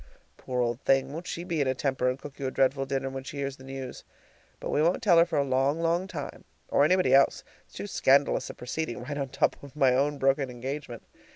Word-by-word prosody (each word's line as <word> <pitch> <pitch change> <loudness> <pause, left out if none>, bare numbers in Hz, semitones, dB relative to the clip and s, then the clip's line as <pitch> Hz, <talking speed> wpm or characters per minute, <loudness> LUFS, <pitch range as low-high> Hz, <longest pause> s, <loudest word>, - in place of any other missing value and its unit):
Poor 125 -1 -3
old 120 +1 -2
thing! 135 +1 +2
won't 170 +3 -6
she 170 - -4
be 170 -4 -1
in 140 - +1
a 130 - +1
temper 130 -1 0
and 130 - -2
cook 145 +1 -11
you 135 - -2
a - - 0
dreadful 135 +1 +1
dinner 135 -1 -1
when 135 0 -5
she 140 - -8
hears 140 -1 -3
the 130 - -14
news! 135 -1 -7 0.6
But - - -4
we 150 - +2
won't 170 +3 +2
tell 175 -6 +6
her 170 - +6
for 165 -3 -2
a 140 - +3
long, 135 +3 +1
long 170 +3 +1
time 160 -7 -7 0.3
or 140 - +4
anybody 185 +4 +3
else. 135 0 +4 0.2
It's - - -21
too - - -5
scandalous 140 -8 +2
a - - -8
proceeding 125 -1 -4
right 145 +3 -5
on 135 -1 -2
top - - 0
of 140 0 -12
my 135 -4 +4
own 140 +3 +1
broken 135 0 +2
engagement. 125 0 -6
135 Hz, 245 wpm, -28 LUFS, 130-150 Hz, 0.6 s, tell